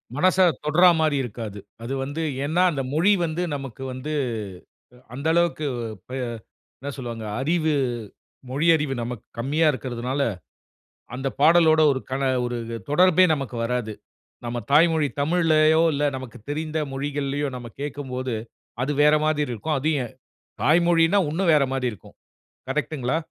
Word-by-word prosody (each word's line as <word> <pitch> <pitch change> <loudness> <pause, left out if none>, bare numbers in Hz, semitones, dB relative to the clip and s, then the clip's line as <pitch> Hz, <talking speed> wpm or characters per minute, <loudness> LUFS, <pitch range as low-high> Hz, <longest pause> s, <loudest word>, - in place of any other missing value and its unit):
மனச 185 +5 +2 0.3
தொடறா 175 +4 +6
மாரி 155 -3 +2
இருக்காது. 110 -3 -6 0.2
அது 130 +3 -4
வந்து 145 +4 -4 0.2
ஏன்னா 160 +5 +1
அந்த 135 -3 -2
மொழி 175 +7 +4
வந்து 160 +2 -3
நமக்கு 135 -2 -7
வந்து 145 +4 -5 1.0
அந்த 140 +4 -5
அளவுக்கு 170 -3 +1 0.5
அ - - -4 0.6
என்ன 140 +2 -5
சொல்வாங்க 115 -4 -6 0.2
அறிவு 160 +1 +1 0.8
மொழியறிவு 150 -1 +2
நமக்கு 120 -2 -6
கம்மியா 150 +6 +1
இருக்குறதுனால 130 +1 -4 0.9
அந்த 135 +2 -2
பாடலோடு 160 0 +6
ஒரு 130 - -3
கண 135 +1 -2 0.2
ஒரு 120 0 -2 0.3
தொடர்பே 185 +3 +5
நமக்கு 135 -4 -5
வராது. 120 -2 -2 0.5
நம்ம 120 0 -3
தாய்மொழி 160 -1 +4
தமிழ்லயோ 160 0 +3
இல்ல 145 +1 0
நமக்கு 130 -4 -9
தெரிந்த 155 +1 -2
மொழிகள்லயோ 145 +1 -2
நம்ம 120 -1 -8
கேட்கும்போது, 130 -4 -4 0.5
அது 145 +3 0
வேற 150 +1 +6
மாரி 155 -1 +1
இருக்கும். 130 +6 -2
அது 155 +4 0 0.7
தாய்மொழினா 170 +3 +4
இன்னும் 170 +1 +2
வேற 145 -2 +5
மாதிரி 130 -2 0
இருக்கும். 90 - -16 0.5
கரெக்டுங்களா? 140 0 -1
145 Hz, 130 wpm, -24 LUFS, 130-160 Hz, 1.0 s, தொடறா